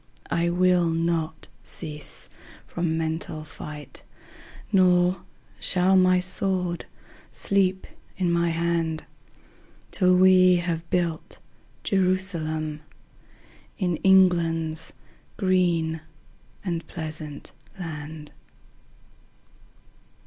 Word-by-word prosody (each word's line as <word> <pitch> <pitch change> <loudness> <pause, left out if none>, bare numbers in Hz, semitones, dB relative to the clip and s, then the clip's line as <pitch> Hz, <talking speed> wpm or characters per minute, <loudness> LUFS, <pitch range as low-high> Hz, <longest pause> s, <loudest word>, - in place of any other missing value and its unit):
I 170 0 +1
will 180 -1 +3
not 165 -1 -1 0.2
cease 150 -3 -5 0.4
from 170 -2 -2
mental 160 -1 -3
fight, 150 -1 -9 0.7
Nor 180 -2 +4 0.4
shall 185 +1 +3
my 185 -1 +5
sword 180 -1 -1 0.5
sleep 190 -1 +1 0.3
in 180 -2 +1
my 170 0 +2
hand 165 -1 -1 0.9
Till 185 -1 +4
we 185 0 +6
have 170 -1 -2
built 170 -3 -1 0.5
Jerusalem 170 -5 0 1.0
In 180 -4 0
England's 165 -4 +3 0.4
green 175 -5 +1 0.6
and 170 -3 -3
pleasant 155 -3 -6 0.3
land. 155 -2 -7
170 Hz, 75 wpm, -25 LUFS, 160-185 Hz, 1.0 s, we